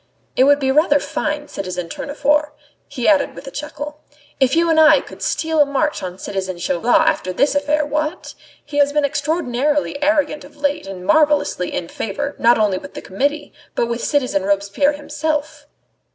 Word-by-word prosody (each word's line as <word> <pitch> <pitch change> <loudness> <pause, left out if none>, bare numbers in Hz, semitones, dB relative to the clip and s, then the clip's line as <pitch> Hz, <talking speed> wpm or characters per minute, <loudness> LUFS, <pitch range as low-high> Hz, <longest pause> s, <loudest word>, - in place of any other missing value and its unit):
It 260 - +5
would 285 +1 +5
be 265 -1 +1
rather 290 0 +4
fine, 295 +1 -3
citizen 180 -6 -5
Tournefort," 295 - -1 0.3
he 255 -4 -3
added 290 -3 +3
with - - -10
a 270 - -8
chuckle, 295 +1 -6 0.4
"if 265 +1 +3
you 335 +1 +3
and 325 -1 +3
I 315 0 +7
could - - -12
steal 320 0 -1
a - - +6
march 295 +2 0
on 180 -1 -6
citizen 190 -2 -4
Chauvelin 230 - +2
over 305 -12 +1
this 280 +11 +2
affair, 295 +1 +1
what? 305 +4 -3 0.3
He 290 0 -6
has 285 0 +3
been 295 -1 +2
extraordinarily 285 -1 -1
arrogant 300 0 +1
of 295 +1 -15
late 285 -6 -1
and 185 -2 -8
marvellously 290 - +2
in 170 - -3
favour, 280 +11 -4
not 235 +1 +5
only 205 -4 +1
with - - -12
the - - -6
Committee, 285 +10 -2 0.2
but - - +1
with 235 0 -3
citizen 255 -9 +1
Robespierre 200 +9 +1
himself." 295 0 -3
285 Hz, 180 wpm, -19 LUFS, 235-300 Hz, 0.4 s, I